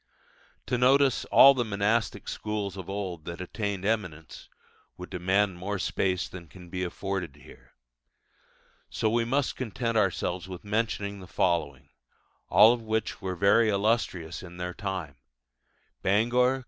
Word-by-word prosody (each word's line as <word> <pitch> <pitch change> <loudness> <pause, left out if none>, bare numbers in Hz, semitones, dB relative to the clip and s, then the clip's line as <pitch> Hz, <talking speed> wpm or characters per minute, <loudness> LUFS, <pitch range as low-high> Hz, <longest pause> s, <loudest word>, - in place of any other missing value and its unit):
To 125 - -1
notice 135 +1 +4
all 140 - +8
the 125 -2 0
monastic 105 +1 -1
schools 105 -2 -3
of 95 -2 -8
old 95 -5 -4
that 85 0 -6
attained 100 0 -4
eminence 90 -9 -3 0.5
would 90 0 -9
demand 95 +1 +1
more 100 +3 -3
space 95 +1 -1
than 90 -3 -10
can 90 +2 -14
be 90 +1 -3
afforded 90 -4 -4
here. - - -17 1.1
So 110 - 0
we 115 0 +1
must 135 +3 0
content 115 -1 -2
ourselves 95 -2 0
with 90 -2 -8
mentioning 100 -2 -2
the 95 - -11
following, 80 -7 -1 0.6
all 110 +2 +7
of 120 - -4
which 110 -1 -2
were 95 -1 -3
very 100 +5 +4
illustrious 100 -5 0
in 90 -1 -11
their 90 0 -4
time: 90 -8 -5 0.8
Bangor 120 +6 +3
(Co. - - -7
100 Hz, 145 wpm, -28 LUFS, 90-110 Hz, 1.1 s, all